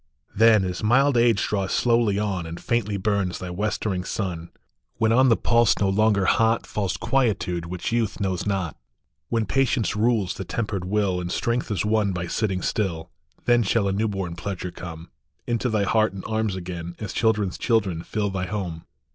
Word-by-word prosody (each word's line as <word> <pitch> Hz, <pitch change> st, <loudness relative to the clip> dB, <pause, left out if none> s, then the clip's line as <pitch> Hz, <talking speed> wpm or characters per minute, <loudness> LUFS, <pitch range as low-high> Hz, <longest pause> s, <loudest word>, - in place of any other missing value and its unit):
" -, -, -49 dB
" -, -, -33 dB
Then, 110 Hz, -1 st, +6 dB
as 90 Hz, -1 st, -4 dB
mild 135 Hz, +5 st, +4 dB
age 115 Hz, -4 st, +3 dB
draws 100 Hz, -2 st, -1 dB
slowly 115 Hz, -4 st, +2 dB
on, 100 Hz, -5 st, -2 dB
And 85 Hz, +1 st, -7 dB
faintly 105 Hz, -4 st, -1 dB
burns 100 Hz, -2 st, 0 dB
thy 90 Hz, -1 st, -6 dB
westering 100 Hz, -1 st, -2 dB
sun, 90 Hz, -5 st, -4 dB, 0.5 s
When 110 Hz, -1 st, +2 dB
on 130 Hz, +3 st, +5 dB
the 115 Hz, -, +4 dB
pulse 120 Hz, -2 st, +3 dB
no 100 Hz, -, +1 dB
longer 100 Hz, -1 st, +3 dB
hot 115 Hz, +3 st, +2 dB
Falls 100 Hz, -3 st, -2 dB
quietude 100 Hz, -10 st, 0 dB
which 90 Hz, +4 st, -4 dB
youth 115 Hz, -3 st, 0 dB
knows 95 Hz, -2 st, -1 dB
not, 95 Hz, -6 st, -1 dB, 0.5 s
When 115 Hz, -2 st, +1 dB
patience 130 Hz, -4 st, +1 dB
rules 105 Hz, -4 st, +1 dB
the -, -, -6 dB
tempered 100 Hz, -2 st, -3 dB
will, 95 Hz, -2 st, 0 dB
And 90 Hz, 0 st, -4 dB
strength 120 Hz, +5 st, -1 dB
is 105 Hz, -2 st, -1 dB
won 105 Hz, -2 st, +1 dB
by 85 Hz, -1 st, -3 dB
sitting 95 Hz, 0 st, -1 dB
still, 85 Hz, -6 st, -2 dB, 0.3 s
Then 120 Hz, 0 st, +4 dB
shall 105 Hz, 0 st, +1 dB
a -, -, +1 dB
new 110 Hz, +3 st, +1 dB
born 95 Hz, -4 st, -3 dB
pleasure 90 Hz, 0 st, -5 dB
come 85 Hz, -1 st, -9 dB, 0.3 s
Into 120 Hz, +1 st, 0 dB
thy 110 Hz, -3 st, +1 dB
heart 110 Hz, 0 st, +2 dB
and 95 Hz, -, -7 dB
arms 110 Hz, -3 st, -1 dB
again, 85 Hz, -2 st, -6 dB
As 105 Hz, -3 st, -6 dB
children 110 Hz, -3 st, +2 dB
s -, -, -9 dB
children 100 Hz, -8 st, +1 dB
fill 105 Hz, +2 st, -2 dB
thy 90 Hz, -1 st, -3 dB
home." 90 Hz, -6 st, -4 dB
100 Hz, 190 wpm, -24 LUFS, 90-110 Hz, 0.5 s, Then